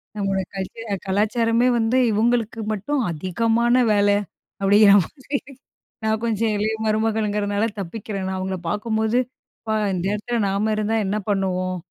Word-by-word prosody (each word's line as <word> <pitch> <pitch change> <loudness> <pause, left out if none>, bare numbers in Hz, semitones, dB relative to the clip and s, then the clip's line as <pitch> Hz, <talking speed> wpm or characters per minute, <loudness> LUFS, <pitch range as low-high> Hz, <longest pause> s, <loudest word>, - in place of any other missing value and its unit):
நம்மோட 195 -2 -1 0.2
கல்ச்சர் 210 +4 -6
அ - - +2
கலாச்சாரமே 230 +4 +2
வந்து 230 +2 +1
இவுங்களுக்கு 225 +1 +1
மட்டும் 255 +7 -1
அதிகமான 225 +9 +1 0.2
வேல, 205 0 +3 0.5
அப்டிங்கிற 200 +1 +6
மாதிரி 280 0 -5 0.7
நான் 220 0 0
கொஞ்சம் 225 -1 0
இளைய 215 +2 0
மருமகள்ங்குறனால 215 -1 0
தப்பிக்கிறேன். 195 +1 -5
நான் 190 0 -2
அவுங்கள 190 0 -3
பாக்கும்போது, 220 +3 0 0.4
அப்பா! 220 -1 -2 0.2
இந்த 180 0 -2
இடத்துல 235 +3 -2
நாம 210 +3 0
இருந்தா 215 +1 0
என்ன 205 +2 -1
பண்ணுவோம்? 185 -2 0
215 Hz, 130 wpm, -22 LUFS, 195-225 Hz, 0.7 s, அப்டிங்கிற